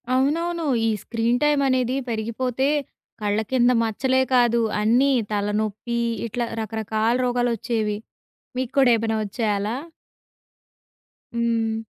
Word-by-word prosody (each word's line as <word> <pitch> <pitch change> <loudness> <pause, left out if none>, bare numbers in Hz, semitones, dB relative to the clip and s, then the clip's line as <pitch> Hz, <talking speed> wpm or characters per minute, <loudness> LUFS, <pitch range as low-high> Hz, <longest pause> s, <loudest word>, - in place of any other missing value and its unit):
అవునవును. 330 +5 0 0.2
ఈ - - +3
screen 235 +1 0
time 295 -1 +3
అనేది 255 0 +1
పెరిగిపోతే, 235 +4 -1 0.5
కళ్ళ 205 +1 +1
కింద 250 -1 +4
మచ్చలే 260 +4 +1
కాదు, 235 -1 +4 0.2
అన్నీ 245 +6 +4 0.2
తలనొప్పి 210 +3 -1 0.3
ఇట్లా 235 +2 -2
రకరకాల 220 +1 -1
రోగాలొచ్చేవి. 235 -3 0 0.6
మీకు 255 0 -2
కూడా 260 -3 +6
ఏమైనా 225 0 -1
ఒచ్చాయా 210 +1 -1
అలా? 215 +4 -2 1.6
హ్మ్. 225 -1 0
235 Hz, 105 wpm, -23 LUFS, 220-255 Hz, 1.6 s, కూడా